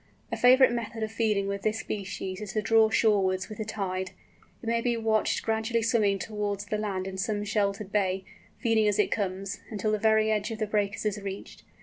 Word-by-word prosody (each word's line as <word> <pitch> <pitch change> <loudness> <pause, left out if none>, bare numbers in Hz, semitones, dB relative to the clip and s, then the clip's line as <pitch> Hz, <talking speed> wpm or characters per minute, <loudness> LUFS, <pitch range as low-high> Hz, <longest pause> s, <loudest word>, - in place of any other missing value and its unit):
A - - 0
favourite 255 0 +6
method 230 -1 -3
of 220 - -3
feeding 215 -3 +1
with 200 0 -3
this 215 +1 0
species 195 -1 -5
is 205 -2 -6
to 215 - +1
draw 225 0 +5
shorewards 195 -4 +2
with 215 - -9
the 215 - -2
tide. 190 -3 -3 0.5
It - - -7
may 230 0 +1
be 240 -1 0
watched 220 -1 +1
gradually 225 +1 0
swimming 215 -3 +2
towards 205 -1 -3
the 210 +1 -2
land 195 -3 -2
in 190 0 -5
some 205 +1 -1
sheltered 200 -1 -1
bay, 190 -2 +1 0.3
feeding 225 -3 +2
as 205 -1 +2
it 210 - +2
comes, 195 -1 -2
until 215 0 -1
the 215 - 0
very 220 0 +3
edge 210 0 0
of 225 - -4
the 215 - -1
breakers 205 0 -1
is 210 0 -1
reached. 195 0 -7
210 Hz, 210 wpm, -28 LUFS, 200-220 Hz, 0.5 s, favourite